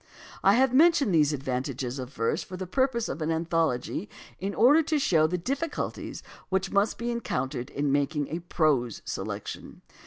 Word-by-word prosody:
I 195 - +6
have 260 0 +3
mentioned 290 - +5
these 155 -2 +4
advantages 130 -1 -3
of 130 0 -6
verse 115 -4 -1
for 185 - -8
the 185 - -4
purposes 235 +3 0
of 155 - -5
an 155 - -1
anthology 165 +1 -1 0.3
in 195 +2 -3
order 285 +8 +6
to 310 0 0
show 165 - +3
the 180 +3 -1
difficulties 280 - -4 0.3
which 190 0 0
must 200 +2 +2
be 240 +1 -2
encountered 130 - -3
in 145 0 -1
making 145 +1 0
a 165 - -3
prose 150 - 0
selection. - - -6
170 Hz, 165 wpm, -27 LUFS, 140-235 Hz, 0.3 s, I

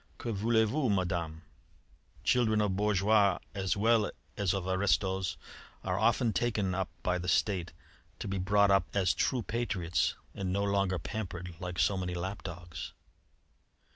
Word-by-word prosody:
'Que 120 - -4
voulez 110 +2 +3
vous, 135 +2 0
Madame? 85 -4 -1 0.8
Children 110 -3 +3
of 105 -3 +1
bourgeois 100 -1 +3 0.2
as 95 -1 -1
well 110 0 +3 0.3
as 100 -3 +1
of 95 -2 -2
aristos 95 0 +1 0.5
were 95 0 -1
often 115 +1 +3
taken 100 -2 0
up 95 -1 -1
by 90 0 +1
the 90 - -5
State 90 0 +1 0.5
to - - -5
be 95 -1 -2
brought 100 +2 +4
up 95 -4 +3
as 95 -1 +3
true 125 +3 0
patriots 95 -9 0 0.2
and 95 -2 -3
no 100 +2 0
longer 100 -2 +1
pampered 90 -1 -5
like 90 -1 -5
so 100 - +2
many 90 -1 -3
lap 95 +4 -4
dogs.' 85 -2 -7
95 Hz, 150 wpm, -31 LUFS, 90-105 Hz, 0.8 s, brought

